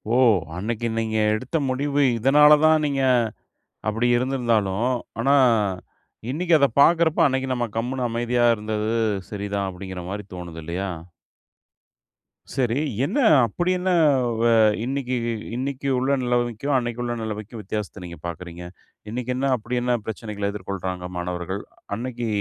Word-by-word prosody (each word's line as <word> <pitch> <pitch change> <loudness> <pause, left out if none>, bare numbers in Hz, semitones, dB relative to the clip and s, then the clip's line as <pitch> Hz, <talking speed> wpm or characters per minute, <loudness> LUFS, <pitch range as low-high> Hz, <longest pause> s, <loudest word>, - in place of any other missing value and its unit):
ஓ! - - +4 0.4
அன்னைக்கு 115 +4 -2
நீங்க 110 -1 -1 0.2
எடுத்த 130 +8 -2
முடிவு, 140 +2 +1
இதனால 150 +5 +6
தான் 155 -1 +4
நீங்க 140 -2 0 0.9
அப்டி 115 +3 0
இருந்திருந்தாலும், 120 -5 0 0.3
ஆனா 140 - +3 1.0
இன்னைக்கு 170 +4 0
அத 140 - +5
பாக்கிறப்ப, 165 +1 +4
"அன்னைக்கு 130 -1 -1
நம்ம 120 -1 -1
கம்முனு 125 +2 -1
அமைதியா 120 +1 +1
இருந்தது 110 +1 -2 0.4
சரிதான்." 100 -1 -2
அப்டிங்கிற 95 0 -7
மாதிரி 105 +1 -4
தோணுது 85 -2 -7
இல்லையா? 90 +5 -3 1.7
சரி, 125 -2 +1 0.3
என்ன? 195 - -2 0.3
அப்படி 175 +9 -1
என்ன? 185 +1 -1 0.5
வ - - +1 0.4
இன்னைக்கு 130 -1 -2 0.4
இன்னைக்கு 135 +2 -3
உள்ள 135 +2 +2
நெலைமைக்கும், 120 +2 0
அன்னைக்கு 120 -1 -3
உள்ள 120 0 -2
நெலைமைக்கும் 110 +1 -6
வித்தியாசத்த 105 -1 -5
நீங்க 85 -1 -9
பார்க்குறீங்க? 85 0 -7 0.5
இன்னைக்கு 125 +1 -3
என்ன 135 +2 0
அப்படி 120 +2 -3
என்ன 125 0 +1
பிரச்சனைகள 105 -2 -3
எதிர்கொள்றாங்க 95 -2 -5
மாணவர்கள்? 90 +2 -3 0.3
அன்னைக்கு 120 +1 -4
120 Hz, 125 wpm, -23 LUFS, 100-130 Hz, 1.7 s, இதனால